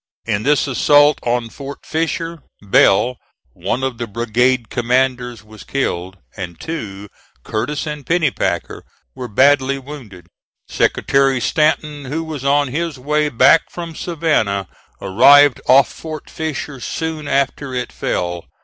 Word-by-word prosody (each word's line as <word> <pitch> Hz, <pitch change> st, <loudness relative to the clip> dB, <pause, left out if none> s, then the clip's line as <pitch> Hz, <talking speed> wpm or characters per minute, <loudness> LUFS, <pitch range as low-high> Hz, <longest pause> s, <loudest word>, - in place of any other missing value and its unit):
In 105 Hz, -2 st, -1 dB
this 145 Hz, +5 st, +2 dB
assault 145 Hz, +2 st, +4 dB
on 120 Hz, -1 st, -1 dB
Fort 140 Hz, 0 st, -9 dB
Fisher, 165 Hz, 0 st, -3 dB, 0.2 s
Bell, 105 Hz, +4 st, +3 dB, 0.4 s
one 130 Hz, -, -3 dB
of 130 Hz, -3 st, -3 dB
the 120 Hz, -, -3 dB
brigade 120 Hz, +2 st, 0 dB
commanders, 125 Hz, -2 st, 0 dB
was 110 Hz, 0 st, -13 dB
killed, 95 Hz, -8 st, -3 dB, 0.2 s
and 90 Hz, -4 st, -7 dB
two, 105 Hz, -12 st, -6 dB, 0.4 s
Curtis 145 Hz, +9 st, -3 dB
and 150 Hz, -2 st, -5 dB
Pennypacker, 160 Hz, -1 st, -1 dB, 0.3 s
were 125 Hz, -, -6 dB
badly 135 Hz, +3 st, +3 dB
wounded. 125 Hz, -, -11 dB, 0.4 s
Secretary 135 Hz, -2 st, +1 dB
Stanton, 150 Hz, +1 st, 0 dB
who 155 Hz, +5 st, -3 dB
was 155 Hz, -4 st, -6 dB
on 140 Hz, 0 st, +2 dB
his 160 Hz, +2 st, -3 dB
way 150 Hz, +3 st, 0 dB
back 150 Hz, +5 st, +4 dB
from 170 Hz, -2 st, -7 dB
Savannah, 145 Hz, -, -1 dB, 0.3 s
arrived 140 Hz, +7 st, +5 dB
off 135 Hz, +1 st, +6 dB
Fort 155 Hz, -2 st, -8 dB
Fisher 150 Hz, -3 st, -5 dB
soon 160 Hz, +2 st, -4 dB
after 140 Hz, -1 st, -1 dB
it 125 Hz, 0 st, -3 dB
fell. 85 Hz, -1 st, -3 dB
135 Hz, 130 wpm, -18 LUFS, 115-150 Hz, 0.4 s, off